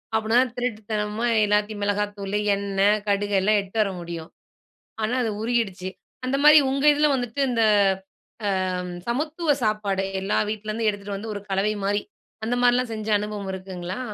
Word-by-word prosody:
அப்புட்ன்னாதான், 230 +3 +2
திருட்டுத்தனமா 215 -2 -2 0.2
எல்லாத்தையும் 210 0 0
மிளகாய்த்தூளு, 205 0 -1 0.2
எண்ணெய், 200 +1 +2
கடுகு 205 0 +1
எல்லாம் 210 +2 +3
எடுத்துட்டு 195 +3 -9
வர 205 - +1
முடியும். 170 -1 -7 0.7
ஆனா, 220 +3 0
அது 225 - 0
உருகிடுச்சு. 220 -6 -1 0.4
அந்த 265 +2 0
மாரி 300 +1 +9
உங்க 275 +1 -1
இதில 295 +1 +3
வந்துட்டு 245 0 -2
இந்த, 230 -2 +1 1.1
அ - - -1
ம் 180 - -6
சமத்துவ 300 +5 0
சாப்பாடு, 205 -3 0 0.2
எல்லா 195 +2 0
வீட்லருந்தும் 215 +1 -1
எடுத்துட்டு 200 -1 -4
வந்து 220 +2 -6
ஒரு 205 - -5
கலவைமாரி, 205 +1 0 0.4
அந்த 240 +2 0
மாரிலாம் 245 0 +3
செஞ்ச 215 -1 -5
அனுபவம் 205 -2 -4
இருக்குங்களா? 185 +1 -6
210 Hz, 145 wpm, -24 LUFS, 200-235 Hz, 1.1 s, மாரி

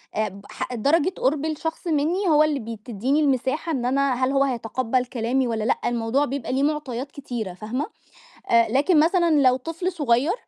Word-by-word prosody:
آآ، 215 -1 0
بح 200 +5 -7
درجة 290 +9 +2
قُرْب 290 +3 0
الشخص 320 +3 -4
مني 330 +6 +1
هو 305 -1 +5
اللي 300 -2 0
بي 225 -1 -6
تدّيني 250 +6 0
المساحة 280 +3 0
إن 250 -5 -1
أنا 275 +1 +2
هل 255 +2 0
هو 275 0 +3
هيتقبَّل 250 0 -1
كلامي 250 +1 -1
والّا 220 -2 -2
لأ. 235 - +1
الموضوع 240 +4 +1
بيبقى 265 -1 -4
ليه 270 +1 +1
معطيات 285 -3 -2
كتيرة، 240 -9 -5
فاهمة، 220 +9 -3 0.6
آآ، 235 0 +5
لكن 295 +5 +3
مثلًا 340 +2 +3
لو 255 -1 +5
طفل 330 +7 -3
صغيّر 290 +1 +1
265 Hz, 180 wpm, -23 LUFS, 240-300 Hz, 0.6 s, هو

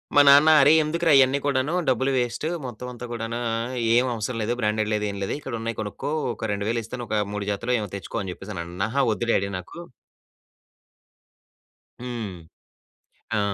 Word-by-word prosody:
మా 145 - +9
నాన్న 145 +3 +8
"అరే! 145 +3 +6
ఎందుకురా 165 +2 +1
ఇయన్నీ 135 +1 +4
కూడాను 140 +3 +1 0.2
డబ్బులు 130 +2 +1
వేస్టు. 120 +4 -1 0.2
మొత్తం 125 +1 -7
అంతా 120 0 -8
కూడాను 115 0 -3
ఆహ్, 115 +3 -3 0.2
ఏమి 125 +1 +3
అవసరం 115 +2 -3
లేదు. 115 +3 0
బ్రాండెడ్ 110 0 0
లేదు 105 0 0
ఏమి 100 0 -6
లేదు - - -2
ఇక్కడ 135 -4 -7
ఉన్నయి 115 0 -4
కొనుక్కో. 105 +7 -4 0.2
ఒక 110 - -5
2000 110 +4 -1
ఇస్తాను. 120 +1 -6
ఒక 105 -1 +1
3 105 -1 -4
జతలో 115 +5 -2
ఏమో 105 - -4
తెచ్చుకో" 100 - -6
అని 95 - -4
చెప్పేసని 95 -2 -7
అన్న 90 +4 -3
అహా! 140 +4 +1
వద్దు 115 +2 -2
డాడీ 100 +1 +1
నాకు 90 - -11 2.2
హ్మ్. 115 -6 -5 1.0
ఆ! - - +2
115 Hz, 175 wpm, -24 LUFS, 105-130 Hz, 2.2 s, మా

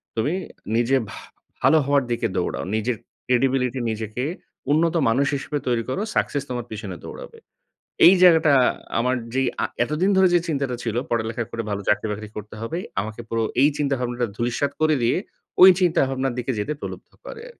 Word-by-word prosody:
তুমি 115 +9 0 0.4
নিজে 120 +3 +3
ভা - - -9 0.4
ভালো 160 - +5
হওয়ার 140 -1 +3
দিকে 120 - 0
দৌড়াও। 90 - -2
নিজের 115 +2 0 0.3
credibility 125 0 +1
নিজেকে 110 +3 -4 0.5
উন্নত 165 +3 +2
মানুষ 140 +5 +2
হিসেবে 145 +2 -3
তৈরি 120 -2 +1
করো 190 - -2
success 145 -1 0
তোমার 120 -2 -3
পেছনে 105 -4 -6
দৌড়াবে।" - - -10 0.7
এই 180 - +9
জায়গাটা 160 -4 +6 0.5
আমার 125 +2 +1 0.2
যেই 135 -1 +2 0.2
আ - - +2 0.2
এতদিন 165 +9 0
ধরে 190 -1 +6
যে 175 - +5
চিন্তাটা 140 -5 -1
ছিল 115 -1 -3
পড়ালেখা 115 0 -1
করে 115 -1 -3
ভালো 100 0 -3
চাকরি 105 - +2
বাকরি 105 +1 -5
করতে 105 0 -8
হবে। 140 +9 -3 0.2
আমাকে 110 +3 -6
পুরো 115 0 -1 0.2
এই 145 - +6
চিন্তাভাবনাটা 125 -4 -1
ধূলিসাৎ 120 +5 -1
করে 155 -1 +3
দিয়ে 115 - +2 0.5
ওই 190 - +11
চিন্তাভাবনার 135 -7 +1
দিকে 125 +2 -1
যেতে 105 +9 -2
প্রলুব্ধ - - -8
করে। 455 - -9
125 Hz, 165 wpm, -23 LUFS, 115-145 Hz, 0.7 s, ওই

